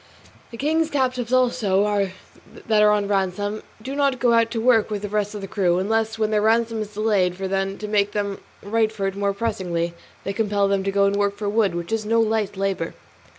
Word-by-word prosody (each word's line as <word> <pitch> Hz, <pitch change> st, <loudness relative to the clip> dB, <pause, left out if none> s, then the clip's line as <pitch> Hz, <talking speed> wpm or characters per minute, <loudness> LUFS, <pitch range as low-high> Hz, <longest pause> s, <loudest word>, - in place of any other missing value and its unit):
The 230 Hz, -, -10 dB
king's 315 Hz, +4 st, +1 dB
captives 255 Hz, -4 st, -1 dB
also, 210 Hz, -6 st, +2 dB, 0.6 s
that 215 Hz, -2 st, +4 dB
are 210 Hz, -, +6 dB
on 205 Hz, -1 st, +2 dB
ransom, 205 Hz, +1 st, -1 dB, 0.2 s
do 265 Hz, +5 st, -6 dB
not 280 Hz, -2 st, +1 dB
go 240 Hz, -1 st, +3 dB
out 230 Hz, 0 st, +3 dB
to 230 Hz, -, -3 dB
work 225 Hz, -2 st, +3 dB
with 210 Hz, -1 st, -4 dB
the 205 Hz, -, -3 dB
rest 210 Hz, 0 st, -1 dB
of 205 Hz, -, -5 dB
the 195 Hz, -, -6 dB
crew, 180 Hz, -3 st, +1 dB
unless 220 Hz, +3 st, 0 dB
when 215 Hz, -1 st, 0 dB
their 210 Hz, -1 st, +2 dB
ransom 225 Hz, +1 st, +2 dB
is 210 Hz, -1 st, -7 dB
delayed; 205 Hz, -4 st, +1 dB
for 190 Hz, +1 st, -4 dB
then, 195 Hz, 0 st, -1 dB
to 210 Hz, -, -6 dB
make 205 Hz, -1 st, +1 dB
them 200 Hz, -2 st, -2 dB, 0.2 s
write 220 Hz, +1 st, +1 dB
for 205 Hz, -3 st, -4 dB
it 195 Hz, 0 st, -2 dB
more 200 Hz, 0 st, 0 dB
pressingly, 185 Hz, -6 st, -2 dB, 0.3 s
they 195 Hz, -, -3 dB
compel 205 Hz, -1 st, +1 dB
them 195 Hz, -1 st, +1 dB
to -, -, +1 dB
work 195 Hz, -, -3 dB
and 200 Hz, 0 st, +1 dB
go 200 Hz, 0 st, +2 dB
for 205 Hz, +1 st, -6 dB
wood, 205 Hz, -4 st, +1 dB
which 170 Hz, +2 st, -5 dB
is 225 Hz, -1 st, 0 dB
no 225 Hz, +2 st, +2 dB
light 220 Hz, -3 st, 0 dB
labour. 195 Hz, -4 st, -2 dB
210 Hz, 225 wpm, -23 LUFS, 195-225 Hz, 0.6 s, are